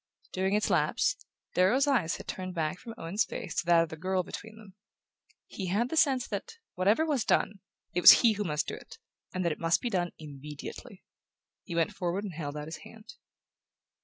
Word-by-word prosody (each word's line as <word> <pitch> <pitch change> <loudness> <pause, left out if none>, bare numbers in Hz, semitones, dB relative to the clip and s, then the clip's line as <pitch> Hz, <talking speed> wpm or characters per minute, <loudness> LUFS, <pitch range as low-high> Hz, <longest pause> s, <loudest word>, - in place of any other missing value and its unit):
During 190 +2 +1
its 210 - +1
lapse, - - +2 0.4
Darrow's 220 +10 +4
eyes 240 - +1
had - - -10
turned 185 -1 -5
back 160 +2 -1
from 230 -2 -9
Owen's 175 +6 0
face 180 - -6
to 175 - -4
that 170 -1 +6
of 165 - -6
the 160 - -6
girl 185 +3 -1
between 220 +4 -9
them. 210 -4 -14 0.7
He 190 - -6
had 215 +7 +1
the - - -3
sense 265 -5 +3
that, 470 - -4 0.2
whatever 205 +12 +2
was 285 -7 0
done, 200 - +1 0.3
it 180 - +1
was - - +10
he 225 - +6
who 210 0 -2
must 150 -5 -1
do - - -4
it, - - -10 0.3
and 185 -1 -2
that 170 - +2
it 150 - -5
must 165 0 +2
be 240 - -3
done 175 -3 0
immediately. 150 -1 -9 0.6
He 170 - -6
went 170 +5 +1
forward 185 +1 -2
and 200 -4 -5
held 150 -2 -5
out 150 - -5
his 160 +1 -7
hand. 215 +7 -13
185 Hz, 205 wpm, -29 LUFS, 165-215 Hz, 0.7 s, was